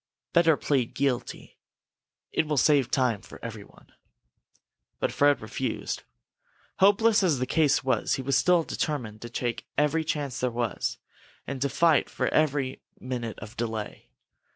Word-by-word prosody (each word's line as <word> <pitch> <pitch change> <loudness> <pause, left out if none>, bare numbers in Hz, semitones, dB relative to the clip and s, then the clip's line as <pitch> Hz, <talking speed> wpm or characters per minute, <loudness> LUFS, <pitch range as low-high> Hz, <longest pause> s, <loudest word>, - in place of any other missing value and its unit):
Better 165 -3 +5
plead 130 -5 0
guilty. 135 -3 -2 0.7
It 160 - 0
will 150 -1 -1
save 140 -1 +4
time 125 -6 +1
for - - -12
everyone." 110 -3 -10 1.1
But - - 0
Fred 145 -2 +3
refused. 110 +2 -3 0.8
Hopeless 210 +3 +5
as 170 -7 +2
the 125 - -1
case 150 0 +2
was, 130 - +1
he 135 - -5
was 135 0 +1
still 175 +4 +4
determined 120 -10 -3
to 120 - -7
take 120 0 -3
every 150 +3 +2
chance 145 -4 -3
there 125 - +1
was, 115 -4 -2 0.5
and 135 -2 -5
to 140 - +1
fight 160 +3 +3
for - - -1
every 140 -4 0 0.2
minute 120 -4 -4
of 105 +3 -9
delay. 110 -2 -5
135 Hz, 145 wpm, -27 LUFS, 120-150 Hz, 1.1 s, Better